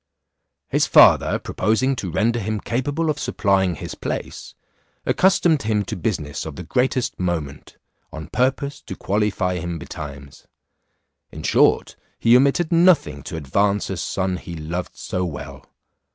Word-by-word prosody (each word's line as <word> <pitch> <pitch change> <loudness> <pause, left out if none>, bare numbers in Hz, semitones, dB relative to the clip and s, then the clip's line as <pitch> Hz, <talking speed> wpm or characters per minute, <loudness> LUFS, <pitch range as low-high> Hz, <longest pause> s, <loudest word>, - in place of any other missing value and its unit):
His - - +1
father - - +6
proposing 110 +7 0
to 95 - -4
render 115 +8 +1
him 110 0 -2
capable 145 +9 -1
of - - -5
supplying 95 -3 +1
his - - -7
place, - - -6 0.5
accustomed 175 -5 +3
him 105 -2 0
to - - -4
business 80 -6 -3
of 80 -3 -7
the 90 - -7
greatest 125 +6 -1
moment, 80 -6 -4 0.3
on 80 0 -7
purpose 135 +3 -1
to 95 - -8
qualify 100 -3 -1
him 85 0 -4
betimes. 70 -3 -9 0.8
In - - -9
short, - - +3 0.2
he 115 +1 +4
omitted 140 +6 +3
nothing 165 - +3
to 80 - -6
advance 100 +8 0
a 95 - -3
son 95 +1 -2
he 85 -1 -8
loved 85 +3 -5
so 90 - -3
well. 70 -5 -7
95 Hz, 140 wpm, -22 LUFS, 80-125 Hz, 0.8 s, father